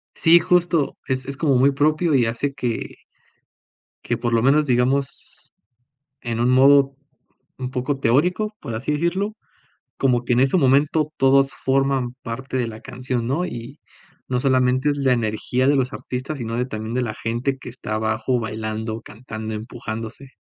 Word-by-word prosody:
Sí, 165 +1 +6
justo, 170 -3 +1
es 130 -1 0
es 140 0 -4
como 140 -2 +2
muy 135 +3 +4
propio 155 +4 +1
y 125 -3 +4
hace 120 +5 -2
que 120 -4 -3 1.1
que - - -1
por 120 -1 -2
lo 115 - +3
menos 145 +3 +4
digamos 130 +1 0 0.7
en 115 -1 -3
un 120 +1 +3
modo 135 +1 +5 0.6
un 130 -1 -4
poco 130 +2 -2
teórico, 180 - +1
por 115 - -6
así 130 +7 -2
decirlo, 175 +7 -1 0.6
como 125 -3 +2
que 120 - +2
en 120 - +3
ese 135 +6 +3
momento 145 +2 +3
todos 135 +1 +4
forman 135 -2 +1
parte 130 +3 -4
de 120 -2 0
la 110 -1 -8
canción, 125 -2 -3
¿no?, 155 +8 0
y 125 -2 -8 0.5
no 125 -1 0
solamente 130 +1 +2
es 145 - 0
la 135 -2 +3
energía 120 +2 0
de 145 - +4
los 130 -1 0
artistas, 130 +4 -5
sino 115 -3 -4
de 125 +1 0
también 110 -2 -5
de 125 - 0
la 110 -3 -3
gente 120 +4 -2
que 130 - -9
está 115 -3 -5
abajo 110 +3 0
bailando, 110 0 -4
cantando, 110 -1 -7
empujándose. 115 +2 -6
130 Hz, 170 wpm, -22 LUFS, 115-140 Hz, 1.1 s, Sí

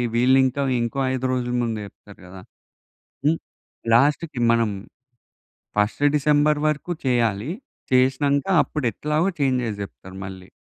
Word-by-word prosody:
వీళ్ళు 125 +3 +4
ఇంకా 130 +2 -1 0.2
ఇంకో 120 +4 -2
5 130 0 -2
రోజుల 125 -1 -1
ముందు 115 -2 -2
జెప్తారు 100 0 -15
గదా! 90 +1 -11 0.9
హ్మ్. 160 +2 +3 0.6
లాస్ట్‌కి 140 +1 +2
మనం 115 -2 +1 1.1
ఫస్ట్ 105 +7 +1
డిసెంబర్ 150 +1 +3
వరకు 155 +4 -2
చేయాలి. 120 -1 +1 0.4
చేశినంక 135 +3 +2 0.2
అప్పుడు 150 -5 -3
ఎట్లాగో 150 - 0
చేంజెస్ 125 -5 0
జెప్తారు 95 -1 -10
మళ్ళీ. 95 -1 -10
130 Hz, 120 wpm, -23 LUFS, 115-145 Hz, 1.1 s, వీళ్ళు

